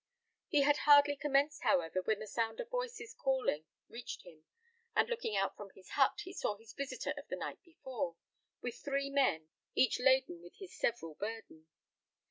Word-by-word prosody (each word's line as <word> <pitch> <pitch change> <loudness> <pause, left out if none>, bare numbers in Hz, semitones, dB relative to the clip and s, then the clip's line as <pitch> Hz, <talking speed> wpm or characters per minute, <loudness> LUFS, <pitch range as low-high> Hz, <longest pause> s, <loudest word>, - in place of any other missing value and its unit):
He 290 -1 +4
had 290 +1 +4
hardly 290 -1 +7
commenced, 285 +1 +1
however, 175 +1 +2
when 215 +3 +1
the 215 - -6
sound 225 - -2
of - - -4
voices 480 -3 -3
calling 260 - 0 0.2
reached 235 +1 -7
him, 160 -3 -15 0.5
and - - +4
looking 470 - -2
out 195 0 +1
from 205 -1 -9
his 185 - -16
hut, 270 -2 +3
he 370 - -8
saw 210 - -1
his 225 +1 -14
visitor 275 +1 -3
of 285 - -12
the - - -3
night - - -5
before, 260 - -5 0.5
with 245 -2 -4
three 275 0 -2
men, 160 - +2 0.3
each 260 - +3
laden 260 -9 +3
with 175 0 -14
his 390 - -10
several 165 -9 -1
burden. 205 -5 -7
260 Hz, 175 wpm, -35 LUFS, 195-285 Hz, 0.5 s, hardly